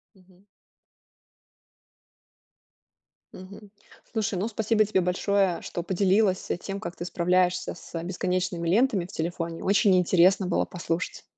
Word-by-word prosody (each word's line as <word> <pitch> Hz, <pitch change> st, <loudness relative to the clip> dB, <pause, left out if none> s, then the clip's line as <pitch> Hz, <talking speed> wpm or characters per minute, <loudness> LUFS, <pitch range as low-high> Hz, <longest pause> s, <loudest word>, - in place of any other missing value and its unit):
Мгм. 185 Hz, +1 st, -24 dB, 2.9 s
Мгм. 200 Hz, +2 st, -12 dB, 0.4 s
Слушай, 215 Hz, -4 st, -1 dB
ну, 200 Hz, +5 st, -1 dB
спасибо 220 Hz, 0 st, +1 dB
тебе 200 Hz, -2 st, +1 dB
большое, 185 Hz, +1 st, +1 dB
что 175 Hz, -, -5 dB
поделилась, 190 Hz, +1 st, +1 dB
а, -, -, -1 dB
тем, 195 Hz, +2 st, -6 dB
как 170 Hz, -2 st, -7 dB
ты 175 Hz, -, -5 dB
справляешься 180 Hz, 0 st, +1 dB
с 165 Hz, -1 st, -7 dB
бесконечными 180 Hz, -1 st, -2 dB
лентами 205 Hz, 0 st, +2 dB
в 180 Hz, -, -12 dB
телефоне. 165 Hz, 0 st, -4 dB
Очень 200 Hz, 0 st, +4 dB
интересно 180 Hz, +1 st, +3 dB
было 175 Hz, -, +1 dB
послушать. 175 Hz, 0 st, -4 dB
185 Hz, 120 wpm, -26 LUFS, 175-200 Hz, 2.9 s, Очень